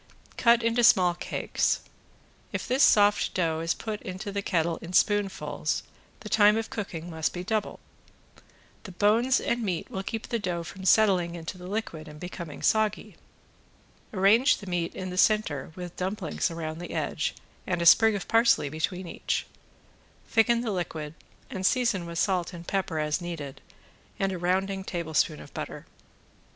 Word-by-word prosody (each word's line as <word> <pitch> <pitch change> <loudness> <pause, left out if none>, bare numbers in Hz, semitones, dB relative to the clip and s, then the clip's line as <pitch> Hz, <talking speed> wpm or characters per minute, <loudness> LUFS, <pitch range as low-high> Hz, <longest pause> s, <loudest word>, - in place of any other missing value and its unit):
Cut 235 -1 +4
into 230 +1 +2
small 185 -6 +6
cakes. 175 - -1 0.7
If - - -4
this 260 +3 +1
soft 205 -4 +4
dough 165 -3 +1
is 165 +1 0
put 215 -2 -5
into 190 +3 -6
the 200 0 -2
kettle 170 -4 0
in 170 +2 -9
spoonfuls 185 -8 +1 0.4
the 215 - -8
time 210 0 +5
of 225 - -3
cooking 175 -6 -5
must 160 -1 -1
be 180 - -5
doubled. 215 +2 -2 1.0
The 190 - -10
bones 225 +7 +3
and 235 0 -1
meat 185 -6 -3
will 190 - -3
keep 220 +3 -5
the 235 - 0
dough 175 -4 -2
from 190 +3 -9
settling 185 -5 +4
into 165 +2 -6
the 180 0 -10
liquid 185 -6 -4
and 150 0 -11
becoming 170 -3 -7
soggy. 215 -1 +1 1.0
Arrange 215 +6 +4
the 205 - -10
meat 175 -2 -2
in 185 -1 -5
the 180 - -2
center 195 -11 +2
with 180 -1 -7
dumplings 185 -2 -2
around 160 -1 -5
the 175 - -7
edge - - -1 0.3
and 180 -2 0
a 170 - -1
sprig 220 +5 +7
of 195 - -5
parsley 230 -10 +3
between 180 +5 -3
each. - - -2 0.8
Thicken 235 +1 +3
the 235 -3 -2
liquid 160 -5 -4 0.3
and 190 -8 -6
season 210 -5 +1
with 170 0 -6
salt 180 -1 0
and 170 -1 -9
pepper 190 -4 -1
as 150 +2 0
needed 160 -6 -6 0.6
and 195 0 0
a 185 - -4
rounding 190 +2 0
tablespoon 160 -4 -1
of - - -13
butter. - - -6
185 Hz, 165 wpm, -27 LUFS, 170-210 Hz, 1.0 s, sprig